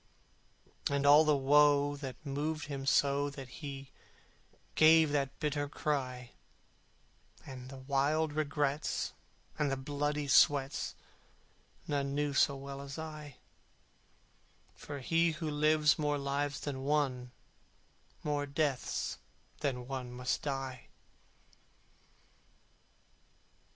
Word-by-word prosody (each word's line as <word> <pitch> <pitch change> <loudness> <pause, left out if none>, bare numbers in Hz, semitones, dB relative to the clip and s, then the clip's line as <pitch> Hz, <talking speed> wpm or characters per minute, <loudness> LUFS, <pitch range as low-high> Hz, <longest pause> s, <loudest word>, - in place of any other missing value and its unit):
And 140 0 0
all 145 +2 +8
the 150 -2 +3
woe 145 +1 +4
that 140 +1 -8
moved 150 +2 -2
him 140 -2 -5
so 140 +1 +3
That 135 -2 -9
he 135 -2 -7 0.8
gave 160 -1 +6
that 140 -2 -1
bitter 145 -2 -1
cry, 130 -5 -3 1.1
And 130 -1 -9
the 135 - -9
wild 145 +3 0
regrets, 145 -1 -1 0.5
and 150 - +2
the 135 - -1
bloody 145 +2 -2
sweats, 140 0 +3 0.9
None 140 -1 -1
knew 145 -1 0
so 140 0 +3
well 140 0 -7
as 140 +1 -8
I: 155 -3 -7 1.4
For 145 -1 -8
he 165 +4 +2
who 155 +1 -4
lives 150 +1 +3
more 150 -1 +1
lives 140 0 -2
than 135 -2 -4
one 135 -3 0 0.9
More 145 -1 -1
deaths 140 -2 -1 0.4
that 140 -4 0
one 125 0 -6
must 125 0 -2
die. 135 -3 -4
145 Hz, 105 wpm, -32 LUFS, 135-150 Hz, 1.4 s, all